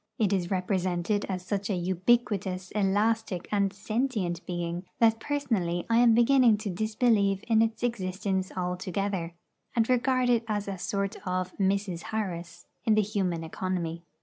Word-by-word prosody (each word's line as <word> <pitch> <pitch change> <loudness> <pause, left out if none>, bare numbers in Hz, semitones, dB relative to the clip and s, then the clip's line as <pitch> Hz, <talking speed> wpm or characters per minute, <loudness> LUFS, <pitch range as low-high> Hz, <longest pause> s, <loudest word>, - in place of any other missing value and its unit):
It 205 -3 +2
is 180 -3 0
represented 185 +1 0
as 185 -1 -3
such 200 0 -2
an 180 -4 -1
ubiquitous, 190 -1 +1
elastic, 205 -1 0
and 200 -2 +2
sentient 205 -4 -2
being, 175 0 -3
that 225 -1 +4
personally 225 -13 -1
I 230 - +5
am 235 -1 +6
beginning 240 -2 +5
to 210 -2 -4
disbelieve 215 0 +1
in 225 -2 +4
its 225 +1 0
existence 190 -4 -1
altogether, 180 0 -2 0.4
and 225 -1 +3
regard 255 0 +2
it 235 -1 +3
as 205 -2 -2
a 195 -2 -4
sort 200 0 -2
of 185 0 -2
'Mrs. 195 -2 0
Harris' 175 -5 -4 0.2
in 220 - +3
the 215 - +4
human 190 -5 -1
economy. 170 0 -3
200 Hz, 150 wpm, -28 LUFS, 180-220 Hz, 0.4 s, am